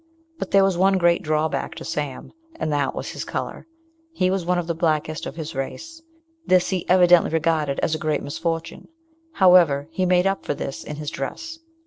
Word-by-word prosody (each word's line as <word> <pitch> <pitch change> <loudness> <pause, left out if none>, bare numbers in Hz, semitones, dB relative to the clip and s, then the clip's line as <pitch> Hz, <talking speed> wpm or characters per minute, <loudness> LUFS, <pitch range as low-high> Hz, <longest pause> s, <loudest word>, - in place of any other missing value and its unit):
But - - -4
there 195 0 +5
was 190 -2 +1
one 190 +1 +4
great 175 -1 +3
drawback 155 -1 -1
to - - -8
Sam, 145 -3 -5 0.2
and 155 - -2
that 145 -2 0
was - - -5
his - - -5
colour. - - -5 0.5
He 185 - +1
was 190 -2 -1
one 180 0 +2
of 175 - -1
the 170 - -2
blackest 155 -1 -1
of - - -7
his 160 -1 -6
race. 320 - -6 0.4
This 185 - +3
he 185 -2 -3
evidently 180 -1 +5
regarded 155 -3 0
as 160 - 0
a 155 - -2
great 155 0 -1
misfortune. 165 +3 -4 0.5
However, 170 - +5
he 185 +2 0
made 180 0 +3
up 195 0 0
for - - -2
this 135 - -5
in 150 - -7
his 150 0 -5
dress. 325 - -6
165 Hz, 195 wpm, -23 LUFS, 155-185 Hz, 0.5 s, there